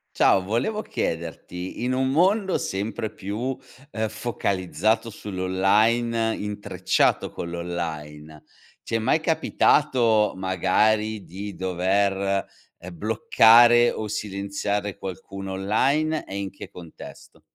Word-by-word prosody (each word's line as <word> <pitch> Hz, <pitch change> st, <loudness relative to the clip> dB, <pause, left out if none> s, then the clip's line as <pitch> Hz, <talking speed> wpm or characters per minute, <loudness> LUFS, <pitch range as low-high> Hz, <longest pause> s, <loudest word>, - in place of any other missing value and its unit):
Ciao, 95 Hz, -, +4 dB
volevo 120 Hz, -, -1 dB
chiederti, 85 Hz, -, -4 dB
in 125 Hz, -, 0 dB
un 130 Hz, +1 st, +1 dB
mondo 190 Hz, +6 st, +2 dB
sempre 105 Hz, +3 st, -3 dB
più, 115 Hz, +7 st, -4 dB, 0.4 s
ehm, 110 Hz, 0 st, -1 dB
focalizzato 105 Hz, 0 st, -1 dB
sull'online, 105 Hz, +4 st, +1 dB
intrecciato 100 Hz, -3 st, 0 dB
con 85 Hz, -, -6 dB
l'online, 80 Hz, -3 st, -6 dB, 0.4 s
ti 115 Hz, -, -2 dB
è -, -, +1 dB
mai 115 Hz, +8 st, +1 dB
capitato, 130 Hz, -8 st, +2 dB
magari, 105 Hz, +4 st, +1 dB
di 100 Hz, +3 st, -7 dB
dover, 95 Hz, +2 st, 0 dB, 0.3 s
ehm, 90 Hz, 0 st, -10 dB
bloccare 115 Hz, +4 st, +5 dB
o 110 Hz, -, -5 dB
silenziare 100 Hz, 0 st, -3 dB
qualcuno 95 Hz, +1 st, -7 dB
online 135 Hz, +11 st, +1 dB
e 95 Hz, -, -6 dB
in 100 Hz, -1 st, -4 dB
che -, -, -10 dB
contesto? 85 Hz, -3 st, -13 dB
100 Hz, 105 wpm, -24 LUFS, 95-115 Hz, 0.4 s, bloccare